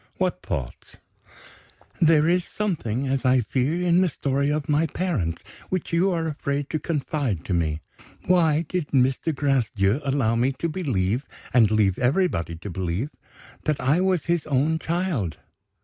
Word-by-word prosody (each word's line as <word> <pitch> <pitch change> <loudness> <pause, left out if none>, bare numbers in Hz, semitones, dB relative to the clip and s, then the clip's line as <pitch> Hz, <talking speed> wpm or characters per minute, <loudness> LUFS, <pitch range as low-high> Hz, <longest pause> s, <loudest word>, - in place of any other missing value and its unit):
"What - - -1
thoughts?" 60 -3 -6 1.0
"There 160 -2 +5
is 180 +1 +3
something, 140 - -2
as 135 0 0
I 130 -1 +4
fear, 130 +9 0
in 175 0 +4
the 185 - +3
story 140 -1 -1
of 150 -1 -1
my 150 +2 +2
parents 125 - -2 0.3
which 185 -2 -3
you 175 +3 +3
are 165 -3 -1
afraid 145 -2 -3
to 155 - -1
confide 140 - -2
to 95 - -2
me. 80 -2 0 0.4
Why 165 -3 +3
did 180 -3 -2
Mr. 135 +4 +1
Gracedieu 125 -5 +1
allow 135 -5 +1
me 125 +4 +1
to 170 - -3
believe 130 - -1 0.3
and 115 -4 +5
leave 105 -4 +2
everybody 125 - +1
to 85 +5 -8
believe, 95 - -2 0.5
that 155 -2 0
I 145 +7 +2
was 185 -4 +1
his 170 -2 0
own 150 +3 +1
child?" 160 - -2
140 Hz, 155 wpm, -24 LUFS, 115-165 Hz, 1.0 s, There